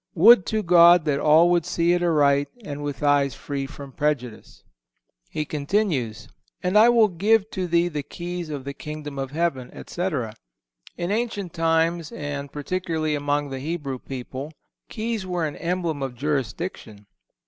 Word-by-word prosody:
Would 195 +2 +7
to 215 -1 0
God 175 -1 +7
that 140 -2 +1
all 160 +4 +5
would 175 -2 +3
see 170 +2 +1
it 175 - +1
aright 145 -4 +3 0.2
and 145 0 -6
with 145 -1 -4
eyes 140 -3 +3
free 140 -1 -4
from 140 -1 -10
prejudice. 130 -6 -3 0.7
He 150 - -3
continues: 140 - -1 0.4
"And 180 +2 0
I 220 +3 +7
will 230 -2 +5
give 210 +4 +2
to 185 -2 -3
thee 170 0 +2
the 150 -4 -3
keys 175 +3 -6
of 145 -3 -5
the 140 +1 -5
Kingdom 150 -2 -7
of 135 -1 -3
Heaven," 145 -5 -1
etc. 150 - -3 0.6
In 175 +2 -2
ancient 210 -5 -2
times, 165 0 +1
and 145 -2 -5
particularly 160 0 -2
among 145 -1 -1
the 135 - -4
Hebrew 145 -3 -4
people, 135 +3 -7 0.4
keys 220 -3 -3
were 175 -3 -1
an 150 - -4
emblem 170 -4 -2
of 135 -2 -4
jurisdiction. 135 - -4
155 Hz, 160 wpm, -24 LUFS, 140-175 Hz, 0.7 s, Would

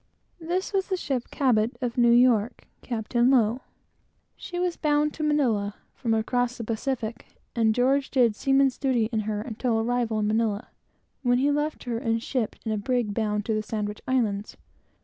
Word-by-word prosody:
This 355 +5 -2
was 385 -1 +1
the 375 - -1
ship 265 -8 -3
Cabot, 240 -4 +1
of 245 -3 -3
New 240 -1 +4
York, 240 -2 +3 0.2
Captain 240 +1 0
Low. 245 -1 +3 0.7
She 355 - -7
was 355 -1 0
bound 300 0 +1
to - - -7
Manilla, 235 -10 +1 0.2
from 230 -4 -1
across 245 +2 0
the 235 - -5
Pacific, 230 0 -3 0.3
and 220 -2 +2
George 270 +2 +2
did 240 -5 +3
seaman's 270 +1 +2
duty 245 -6 +1
in 220 - 0
her 210 0 -2
until 235 0 -2
her 225 - +2
arrival 240 -2 0
in 210 - 0
Manilla, 215 -1 0 0.5
when 245 -2 +2
he 280 +3 +2
left 295 +1 -1
her, 235 -2 -2
and 225 -1 -1
shipped 245 -4 -3
in 220 - -1
a 215 - -1
brig 240 -1 -1
bound 210 -1 -1
to 225 - 0
the 215 - 0
Sandwich 210 -1 -4
Islands. 220 -6 -1
240 Hz, 180 wpm, -26 LUFS, 220-270 Hz, 0.7 s, New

